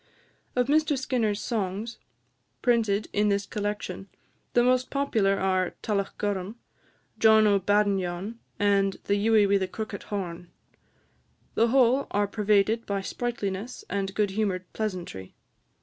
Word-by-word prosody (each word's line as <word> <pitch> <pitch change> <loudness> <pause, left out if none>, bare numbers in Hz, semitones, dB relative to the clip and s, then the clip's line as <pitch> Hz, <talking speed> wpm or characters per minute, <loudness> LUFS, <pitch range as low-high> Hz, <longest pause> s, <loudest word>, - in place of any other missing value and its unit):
Of 250 0 +3
Mr 300 +1 +2
Skinner's 230 -5 0
songs, 215 +1 -3 0.6
printed 220 -4 +2
in 210 0 +2
this 200 0 +1
collection, 205 -2 -4 0.4
the 240 - +4
most 255 +1 +2
popular 225 -8 +1
are 185 -1 0
"Tullochgorum," 200 -1 -2 0.6
"John 220 -1 +6
o' 200 -1 +4
Badenyon," 200 +1 0 0.2
and 200 -1 +2
"The 200 - 0
Ewie 220 -2 +5
wi' 200 0 +4
the 190 - -1
Crookit 215 +1 -6
Horn." 175 -4 -4 1.0
The 230 - +3
whole 260 +2 +3
are 205 0 +1
pervaded 210 +2 +1
by 200 -1 -1
sprightliness 220 0 -4
and 195 0 -2
good 210 -2 +1
humoured 190 -3 -1
pleasantry. 180 - -5
205 Hz, 125 wpm, -27 LUFS, 195-225 Hz, 1.0 s, John